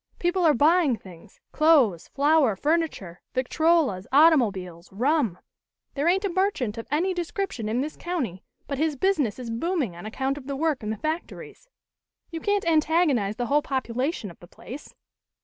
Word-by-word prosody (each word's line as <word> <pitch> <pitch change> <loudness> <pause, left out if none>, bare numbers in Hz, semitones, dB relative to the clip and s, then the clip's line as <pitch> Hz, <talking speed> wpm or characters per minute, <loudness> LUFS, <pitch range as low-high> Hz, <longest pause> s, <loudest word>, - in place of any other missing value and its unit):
People 355 +1 0
are 315 -3 +5
buying 305 0 +4
things 185 -2 -15
clothes, 280 - +3
flour, 285 -5 +2
furniture, 290 - -2
victrolas, 265 - +1
automobiles, 210 - +3
rum. 245 - +1 0.6
"There 290 +3 -1
ain't 380 +3 +2
a - - 0
merchant 345 - -1
of 230 - -8
any 340 +7 +1
description 350 - -3
in 235 +4 0
this 300 +2 -4
county 260 - -3 0.3
but 280 -2 -4
his 310 -1 +1
business 295 - 0
is 245 -3 -6
booming 270 - -2
on 175 +5 -8
account 270 +5 -2
of 265 - -14
the 280 - -3
work 305 -1 0
in 210 - -5
the 220 - -3
factories. 320 - -6 0.6
You 330 -1 -5
can't 410 +1 0
antagonize 310 - +2
the 245 +1 -2
whole 290 +4 +2
population 260 - -3
of - - -18
the 175 - -14
place. 265 +10 -11
280 Hz, 165 wpm, -25 LUFS, 225-330 Hz, 0.6 s, are